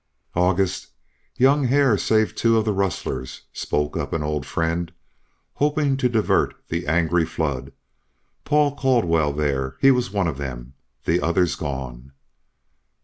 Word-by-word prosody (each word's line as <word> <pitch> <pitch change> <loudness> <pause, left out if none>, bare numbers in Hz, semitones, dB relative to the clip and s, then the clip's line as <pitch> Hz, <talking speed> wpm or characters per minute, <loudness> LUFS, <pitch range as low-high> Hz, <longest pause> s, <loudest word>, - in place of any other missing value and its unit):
"August, 90 +1 +1 0.5
young 135 +2 +4
Hare 135 -2 +4
saved 110 +1 +1
two 115 -1 +3
of 110 - +1
the 105 - +1
rustlers," 95 -9 -3
spoke 75 0 -2
up - - -3
an 80 - -1
old 75 -2 -2
friend, 85 +1 -1 0.6
hoping 145 -1 +1
to 130 -2 +1
divert 110 -3 +1
the 85 -1 -3
angry 85 +1 +2
flood. 75 -5 -3 0.7
"Paul 145 -1 +2
Caldwell 90 - +2
there, 70 -3 -1
he 135 - +6
was 125 -1 +1
one 100 -2 0
of 75 -4 -4
them. 65 -2 -6 0.3
The 85 +2 +2
other's 85 +1 +2
gone." 65 -3 -6
85 Hz, 140 wpm, -23 LUFS, 75-120 Hz, 0.7 s, he